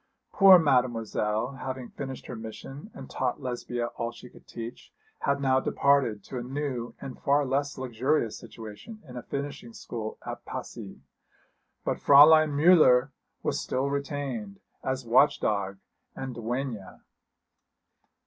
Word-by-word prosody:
Poor 195 -2 +9
Mademoiselle, 120 -4 0
having 130 -1 -5
finished 135 -2 -7
her 125 - -6
mission 115 - -9
and 135 - -9
taught 130 +1 -2
Lesbia 120 -2 -3
all 115 0 -2
she 120 +1 -13
could - - -18
teach, 115 0 -8 0.3
had 140 0 0
now 130 -1 +3
departed 130 -7 +2
to 130 - -6
a - - -4
new 130 -2 -4
and 135 -2 -8
far 145 +1 +3
less 140 +2 -1
luxurious 125 -1 0
situation 115 - -10
in 125 - -11
a 125 - -5
finishing 140 -3 -6
school 110 -2 -6
at - - -6
Passy; - - -8 0.8
but - - 0
Fräulein 155 +2 +8
Müller 145 -4 +5 0.3
was - - 0
still 135 +2 -1
retained, 140 -8 -4 0.2
as 130 -1 -2
watch 125 +5 +4
dog 100 -2 -1 0.4
and 135 -1 -5
duenna. 115 -4 -4
130 Hz, 135 wpm, -28 LUFS, 115-140 Hz, 0.8 s, Poor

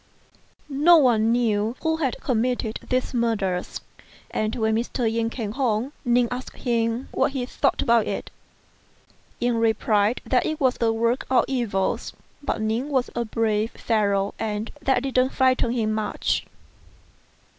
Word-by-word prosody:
No 340 +2 +8
one 230 -6 +4
knew 225 -1 +1
who 320 0 +1
had 275 -6 -1
committed 245 -2 -1
these 255 +1 0
murders, 210 -7 -1 0.5
and 215 +1 -1
when 220 -2 +1
Mr. 235 +1 -1
Yen 225 0 0
came 225 -3 -4
home, 245 +1 -1
Ning 245 -1 +3
asked 250 +1 -6
him 230 0 -1
what - - +1
he 260 -3 -2
thought 275 +2 0
about 235 -3 +3
it. - - -4 1.1
Yen 240 -1 +1
replied 220 0 +2
that 255 - +2
it 310 - -3
was 260 -2 +2
the 230 -1 +2
work 230 +3 0
of 260 - +4
devils, 225 -8 -1 0.3
but 285 - -2
Ning 225 +6 -1
was 260 -4 0
a 235 - -1
brave 220 -1 0
fellow, 200 -3 0
and 215 0 -3
that 265 -2 +1
didn't 260 -1 +2
frighten 260 -2 +2
him 225 -3 0
much. 215 0 -1
235 Hz, 145 wpm, -24 LUFS, 220-255 Hz, 1.1 s, No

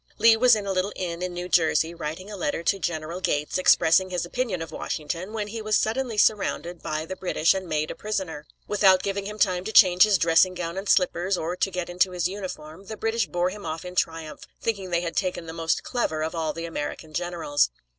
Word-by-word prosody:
Lee 225 +1 +6
was 240 +1 +5
in 210 -2 -4
a 195 - -1
little 190 +2 0
inn 175 -2 -4
in 180 0 -2
New 175 0 -5
Jersey, 165 -1 +2
writing 170 +5 -6
a - - -6
letter 170 -3 -2
to 195 +3 +1
General 170 0 -3
Gates 150 -1 0
expressing 185 +1 +4
his 180 -1 -2
opinion 220 -1 -2
of 165 - -10
Washington, 165 +5 -4
when 210 -2 -3
he 225 +1 -5
was 215 -1 +2
suddenly 230 0 -1
surrounded 185 -5 +1
by 155 0 -3
the 190 - -6
British 180 -3 +2
and 190 -2 -5
made 155 0 -1
a - - -7
prisoner. 185 -8 -4 0.2
Without 190 -3 +4
giving 200 0 -2
him 210 +1 -7
time 185 -4 +1
to 220 - -4
change 185 -4 +6
his 210 -1 +7
dressing 170 +2 +4
gown 170 -1 -4
and 195 +1 -4
slippers, 180 0 +2
or 170 +2 -3
get 180 -1 -2
into 180 +1 +1
his 175 -1 0
uniform, 185 -2 -8
the 220 - -6
British 225 +1 0
bore 175 +1 0
him 205 +1 -9
off 160 +2 -5
in 180 - -7
triumph, 165 -3 -3
thinking 200 -5 -2
they 170 -1 +1
had 170 -1 -4
taken 180 -3 -1
the 160 - -7
most 165 -1 -1
clever 160 -11 -1
of 160 - -3
all 160 -2 -1
the 165 +1 -6
American 155 -1 -5
generals. 170 - 0
180 Hz, 225 wpm, -25 LUFS, 165-200 Hz, 0.2 s, his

